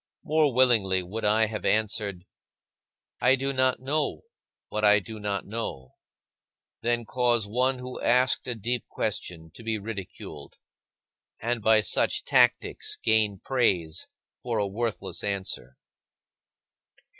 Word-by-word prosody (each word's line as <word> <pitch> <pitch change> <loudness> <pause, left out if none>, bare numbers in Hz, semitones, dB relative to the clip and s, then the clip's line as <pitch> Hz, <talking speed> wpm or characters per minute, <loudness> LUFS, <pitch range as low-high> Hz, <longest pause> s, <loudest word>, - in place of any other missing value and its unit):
More 155 -3 +3
willingly 115 -7 +3
would 105 +6 -6
I 110 +2 +4
have 110 -1 -5
answered, 105 -4 0 1.0
"I 125 +2 +5
do 135 +1 -2
not 130 -1 +2
know 145 +3 -1 0.5
what 105 - -3
I 105 0 +7
do 110 +2 -6
not 100 -1 -2
know," 100 - -5 0.9
than 120 0 0
cause 120 -2 +2
one 125 +5 +1
who 125 0 -7
asked 125 +2 +2
a 125 - -2
deep 120 +2 -2
question 80 -2 -4
to - - -11
be 110 -1 -1
ridiculed 100 -3 -8 0.8
and 120 0 -1
by 110 0 +5
such 100 - +2
tactics - - +2
gain 105 -3 +2
praise 90 -11 0 0.3
for 120 -2 -4
a 105 - +1
worthless 110 +3 -4
answer. 95 -10 -4
110 Hz, 125 wpm, -27 LUFS, 100-125 Hz, 1.0 s, I